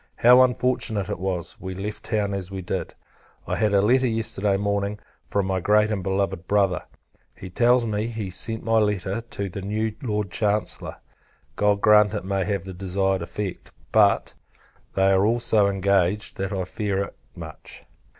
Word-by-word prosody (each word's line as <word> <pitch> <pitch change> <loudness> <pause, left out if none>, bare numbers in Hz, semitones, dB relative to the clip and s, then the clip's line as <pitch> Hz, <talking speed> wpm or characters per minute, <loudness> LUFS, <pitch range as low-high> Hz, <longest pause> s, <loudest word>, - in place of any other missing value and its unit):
How 125 +2 +7
unfortunate 125 -5 +1
it - - -4
was, 90 -2 -3
we 95 -1 -5
left 105 +3 -5
town 105 -3 -1
as 95 -2 -4
we 95 -1 -6
did! - - -4 0.5
I - - -2
had 105 -1 +1
a 100 -1 +3
letter, 130 +4 +3
yesterday 105 -3 0
morning, 100 0 -1 0.3
from 100 -1 0
my 95 -1 0
great 105 +3 +3
and 100 -3 -1
beloved 95 -2 -2
Brother. 100 -3 +1 0.5
He 95 - -10
tells 120 +4 +3
me, 105 0 -1
he 115 -2 -4
has 95 -1 -5
sent 110 -1 -2
my 115 0 +3
letter 105 0 -1
to 110 -4 -5
the 100 +1 -6
new 105 +2 -2
Lord 105 -6 -2
Chancellor; 105 +1 -1 0.6
God 105 -1 +2
grant 105 0 +5
it 105 - -4
may 95 -1 -1
have 100 -3 -2
the 95 - -7
desired 95 0 -1
effect; 95 +2 -5 0.2
but, - - +3 0.6
they 95 0 +4
are 95 0 +4
all 115 +3 +3
so 110 -3 +2
engaged, 100 +1 +1
that 95 0 -3
I 95 -2 -1
fear 100 +1 -2
it - - -9 0.2
much. 80 -2 -11
100 Hz, 180 wpm, -24 LUFS, 95-110 Hz, 0.6 s, How